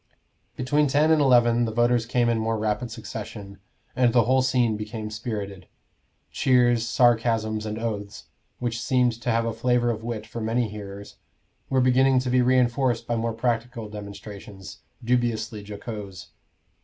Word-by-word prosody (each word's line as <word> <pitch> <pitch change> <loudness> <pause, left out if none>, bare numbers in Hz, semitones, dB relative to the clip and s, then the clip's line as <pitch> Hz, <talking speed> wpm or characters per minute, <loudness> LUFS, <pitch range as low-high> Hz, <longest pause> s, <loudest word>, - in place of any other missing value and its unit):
Between 145 +4 +1
ten 150 +4 +3
and 155 -2 +4
eleven 120 -3 +4
the 110 - -3
voters 120 0 +2
came 120 0 +1
in 115 -1 +1
more 110 0 -1
rapid 110 +3 -1
succession, 105 -3 -8 0.4
and 125 -2 +3
the 120 -2 +5
whole 130 +3 +3
scene 125 -3 +2
became 105 0 -6
spirited. 105 -4 -5 0.6
Cheers, 120 -3 +3
sarcasms, 115 -3 +2
and 105 0 -4
oaths, 105 -3 -5 0.3
which 120 -1 -3
seemed 125 -1 +2
to 125 - -2
have 115 0 +1
a 115 - -2
flavor 120 +1 +1
of 110 -1 -5
wit 115 -2 -4
for 115 - -7
many 115 +2 0
hearers, 100 -1 -9 0.5
were 130 -1 +2
beginning 130 +1 +4
to 130 -1 -2
be 125 0 +4
reinforced 125 -1 +2
by 120 - -1
more 115 0 -1
practical 115 -1 -2
demonstrations, 100 -1 -9 0.2
dubiously 115 -3 -1
jocose. 100 -2 -8
115 Hz, 155 wpm, -25 LUFS, 110-125 Hz, 0.6 s, the